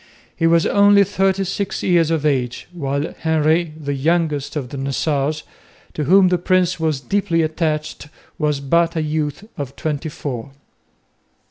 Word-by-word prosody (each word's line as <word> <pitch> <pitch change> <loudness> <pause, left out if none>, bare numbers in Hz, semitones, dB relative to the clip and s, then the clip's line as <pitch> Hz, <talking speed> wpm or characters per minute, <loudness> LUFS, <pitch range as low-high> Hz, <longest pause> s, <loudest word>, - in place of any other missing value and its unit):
He 165 - +1
was 165 0 +4
only 200 0 +5
thirty 195 0 0
six 195 +1 -3
years 170 -3 +3
of 160 -2 0
age, 125 -4 -1
while 140 -2 -3
Henry, 160 +1 +1
the 145 -2 -3
youngest 150 0 0
of 135 -5 -3
the 140 - -7
Nassaus, 140 +2 -1 0.5
to 150 - -2
whom 185 +4 +5
the 180 -1 +1
Prince 180 -1 +1
was 155 -4 0
deeply 170 +2 0
attached, 155 -1 -2 0.3
was 150 -3 0
but 170 +4 +1
a 160 - 0
youth 155 +2 -2 0.2
of 135 -2 -5
twenty 155 0 -3
four. 135 -3 -6
155 Hz, 150 wpm, -20 LUFS, 145-175 Hz, 0.5 s, only